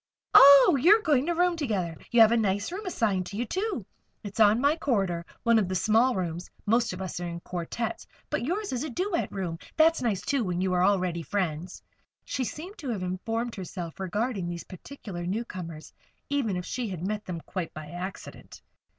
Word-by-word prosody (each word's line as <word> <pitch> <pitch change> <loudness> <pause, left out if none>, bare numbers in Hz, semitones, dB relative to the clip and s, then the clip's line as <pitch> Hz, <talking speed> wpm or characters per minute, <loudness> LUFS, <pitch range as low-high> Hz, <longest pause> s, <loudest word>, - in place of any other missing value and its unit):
"Ah! 280 +4 +9
you're 415 - +6
going 295 -3 +2
to 345 - +1
room 355 0 +2
together. 200 - -2
You 235 - +5
have 220 0 +8
a - - +4
nice 205 - 0
room 390 +2 -5
assigned 200 - 0
to 200 - -7
you, 240 - -1
too. 380 - -2 0.4
It's 205 +1 -7
on 215 +1 +6
my 285 +4 +3
corridor 195 - 0 0.2
one 230 -1 +5
of 200 - 0
the 185 - -2
small 225 +7 +3
rooms. 175 -1 -3 0.2
Most 230 +3 +2
of 180 +1 -5
us 185 - -5
are 175 - -4
in 170 0 -5
quartettes; 215 +7 -4 0.2
but - - -1
yours 375 - -2
is 245 - -2
a 310 - -4
duet 355 - -1
room. 175 -4 -4 0.2
That's 325 +1 +5
nice, 220 -6 0
too, 275 -4 0
when 180 -3 -2
you 185 0 0
are 180 0 +3
already 185 -3 +1
friends." 175 -1 -3 0.4
She 265 - -2
seemed 355 - -7
to 280 - -5
have 210 -6 -2
informed 225 +6 -3
herself 180 -3 -7
regarding 195 0 -2
these 170 -1 -5
particular 185 -3 -8
newcomers, 180 -6 -5 0.4
even 235 -10 0
if 180 - -5
she 250 -2 -3
had 180 -2 -5
met 210 +1 -3
them 175 -2 -4
quite 180 -1 -5
by 155 0 -8
accident. 180 +2 -8
210 Hz, 200 wpm, -27 LUFS, 180-260 Hz, 0.4 s, Ah